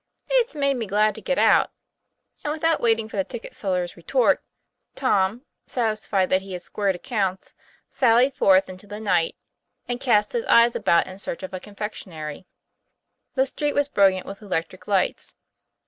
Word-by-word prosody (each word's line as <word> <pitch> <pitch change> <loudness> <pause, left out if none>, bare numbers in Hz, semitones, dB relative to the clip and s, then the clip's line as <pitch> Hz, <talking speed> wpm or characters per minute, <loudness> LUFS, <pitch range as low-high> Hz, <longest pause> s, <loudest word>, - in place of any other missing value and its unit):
' - - -33
"It's 470 -8 -6
made 280 -2 +1
me 225 -3 -3
glad 210 +2 +2
to - - -10
get - - -1
out," - - +4 0.7
and 295 - -1
without 325 +1 +1
waiting 225 -2 +2
for 220 - -8
the 195 - +2
ticket 235 +4 -9
seller's 180 -3 -2
retort, - - +1 0.5
Tom, 220 0 +1 0.2
satisfied 215 -5 0
that 185 - +3
he 190 0 -9
had 180 0 -6
squared 200 -1 -1
accounts, 190 -2 -3 0.3
sallied 255 0 +3
forth 195 -6 +4
into 185 +2 -11
the 205 +1 -7
night, 180 -6 +1 0.5
and 245 0 -3
cast 210 -5 +2
his 475 -1 -1
eyes 235 - +5
about 170 - +3
in 190 +1 -10
search 190 - -5
of 190 - -7
a 185 - -4
confec 210 +2 -6
tionery. 155 -3 -8 0.9
The 265 0 +3
street 290 +2 -2
was 285 0 +1
brilliant 195 -6 +3
with 200 +2 -9
electric 185 -2 -4
lights. 195 -3 0
210 Hz, 175 wpm, -24 LUFS, 190-245 Hz, 0.9 s, eyes